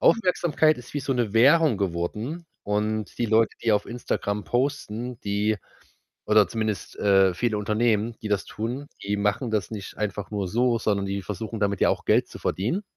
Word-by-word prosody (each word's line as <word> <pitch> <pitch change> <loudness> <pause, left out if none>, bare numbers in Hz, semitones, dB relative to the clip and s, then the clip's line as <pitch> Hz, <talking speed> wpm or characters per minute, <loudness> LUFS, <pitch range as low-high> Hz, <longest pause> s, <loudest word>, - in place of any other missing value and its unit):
Aufmerksamkeit 175 - +3
ist 125 - -12
wie 145 - 0
so 135 0 -1
'ne 120 -5 0
Währung 140 +2 +5
geworden 100 - -3 0.2
und 105 +1 -1
die 120 - +1
Leute, 110 +1 +3
die 115 - +2
auf 105 0 +1
Instagram 105 -3 -2
posten, 125 -2 -2
die 105 +1 0 0.7
oder 105 -2 +5
zumindest, 110 -3 -3
äh, 95 -2 +4
viele 115 +2 0
Unternehmen, 110 +1 +1
die 110 - -3
das 100 -2 0
tun, 120 +6 -4 0.2
die 100 +1 -1
machen 105 +4 0
das 105 -3 -1
nicht 105 -3 -7
einfach 105 -1 -3
nur 100 -3 -2
so, 120 +2 +2
sondern 100 -2 0
die 100 0 -3
versuchen 110 +4 -5
damit 100 -2 0
ja - - +5
auch - - -2
Geld - - +3
zu - - -10
verdienen. 120 - -1
110 Hz, 180 wpm, -25 LUFS, 100-120 Hz, 0.7 s, Währung